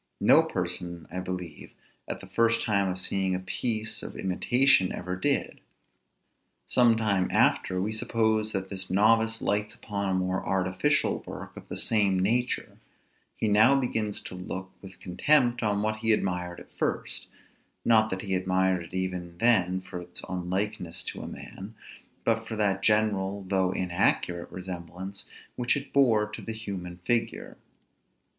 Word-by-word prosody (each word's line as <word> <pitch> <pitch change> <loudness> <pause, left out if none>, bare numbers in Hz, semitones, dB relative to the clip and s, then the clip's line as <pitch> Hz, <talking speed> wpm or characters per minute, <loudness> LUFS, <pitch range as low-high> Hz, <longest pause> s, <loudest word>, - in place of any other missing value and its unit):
No - - +6
person, 85 -1 -3
I - - -1
believe, 90 -4 -6 0.4
at - - -5
the - - -10
first 115 0 +2
time 100 -3 +1
of 90 - -2
seeing 95 0 +1
a - - -2
piece 110 +2 -2
of - - -7
imitation 120 +2 +3
ever 90 +1 -4
did. 95 - 0 1.1
Some 120 -2 +4
time 100 -4 +1
after, 90 - +2
we 105 +4 -1
suppose 110 -1 +1
that 95 -1 -4
this 95 -1 -5
novice 110 +3 +3
lights 105 +1 0
upon 100 -2 -3
a 95 - +1
more 95 0 -1
artificial 95 +10 +1
work - - -8
of - - -11
the - - -4
same 100 -4 +3
nature; 120 +7 -1 0.6
he 110 - -1
now 110 +7 +5
begins 110 -5 -1
to - - -8
look 95 +1 -6
with 95 -2 -12
contempt 120 +7 +3
on 105 -2 +1
what 110 0 0
he 110 0 +3
admired 90 -3 -2
at - - -15
first; - - -3 0.6
not 110 -1 +4
that 95 -1 -4
he 95 -2 -2
admired 95 0 +1
it 85 - -11
even 90 -2 -3
then 95 -5 +4
for 90 -1 -7
its 90 0 -8
unlikeness 90 0 -2
to - - -5
a - - -6
man, 100 +4 -9 0.5
but 115 0 +1
for 110 - -4
that 100 -3 +1
general 100 -2 +1
though 95 -1 +1
inaccurate 90 -1 0
resemblance 95 +1 -6 0.3
which 125 +2 +1
it 140 0 -8
bore 115 -7 +4
to 105 0 -8
the 115 - -4
human 95 -5 -6
figure. 120 -1 0
100 Hz, 155 wpm, -28 LUFS, 95-110 Hz, 1.1 s, No